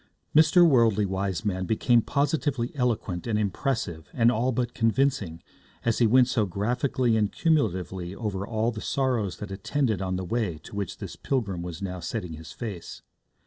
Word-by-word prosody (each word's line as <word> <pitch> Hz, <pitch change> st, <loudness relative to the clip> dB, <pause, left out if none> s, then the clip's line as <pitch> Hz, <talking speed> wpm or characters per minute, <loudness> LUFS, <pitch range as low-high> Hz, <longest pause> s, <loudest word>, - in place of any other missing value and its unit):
Mr. 160 Hz, +3 st, +7 dB
Worldly 115 Hz, -7 st, +4 dB
Wiseman 95 Hz, 0 st, -2 dB
became 115 Hz, +2 st, +3 dB
positively 140 Hz, -2 st, 0 dB
eloquent 115 Hz, -, -1 dB
and 110 Hz, -2 st, +1 dB
impressive 105 Hz, -, -2 dB
and 120 Hz, -1 st, +4 dB
all 125 Hz, +2 st, +1 dB
but 120 Hz, 0 st, -1 dB
convincing 115 Hz, -8 st, 0 dB, 0.4 s
as 115 Hz, -2 st, +1 dB
he 120 Hz, -, +5 dB
went 125 Hz, +2 st, +5 dB
so 110 Hz, -5 st, +1 dB
graphically 120 Hz, +5 st, 0 dB
and 105 Hz, -2 st, +1 dB
cumulatively 95 Hz, -, 0 dB
over 100 Hz, -4 st, -3 dB
all 115 Hz, +1 st, 0 dB
the 110 Hz, -2 st, -7 dB
sorrows 125 Hz, -8 st, 0 dB
that 105 Hz, -1 st, -7 dB
attended 110 Hz, +1 st, -1 dB
on 95 Hz, -1 st, -1 dB
the 90 Hz, 0 st, -3 dB
way 105 Hz, -5 st, -1 dB
to -, -, -10 dB
which 100 Hz, -3 st, -3 dB
this -, -, -7 dB
pilgrim 100 Hz, -10 st, -2 dB
was 85 Hz, +1 st, -6 dB
now 90 Hz, -1 st, -4 dB
setting 90 Hz, 0 st, -4 dB
his 80 Hz, +1 st, -9 dB
face. 105 Hz, -8 st, -7 dB
110 Hz, 165 wpm, -26 LUFS, 95-125 Hz, 0.4 s, Mr